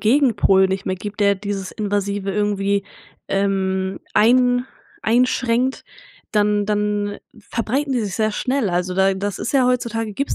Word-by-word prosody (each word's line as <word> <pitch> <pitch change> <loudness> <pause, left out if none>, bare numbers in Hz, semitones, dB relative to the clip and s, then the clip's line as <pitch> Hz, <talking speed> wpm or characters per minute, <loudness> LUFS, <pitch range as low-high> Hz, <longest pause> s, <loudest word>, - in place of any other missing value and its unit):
Gegenpol 215 -6 +4
nicht 190 +1 -3
mehr 185 - -1
gibt, 205 +3 -7
der 200 -1 +4
dieses 195 -1 -4
Invasive 200 -1 -2
irgendwie, 200 -1 0 0.4
ähm, 190 -1 0
ein 245 +2 +4 0.4
einschränkt, 250 +2 +1 0.5
dann 210 -1 +2
dann 205 -1 -1 0.2
verbreiten 255 +6 -2
die 250 - +1
sich 200 -4 -3
sehr 215 -1 +1
schnell. 255 -2 0
Also 180 +1 -1
da 190 +1 +3
das 195 0 -3
ist - - -3
ja 265 -3 +4
heutzutage, 230 -3 -1
gibt's 280 +6 -1
205 Hz, 145 wpm, -21 LUFS, 195-235 Hz, 0.5 s, Gegenpol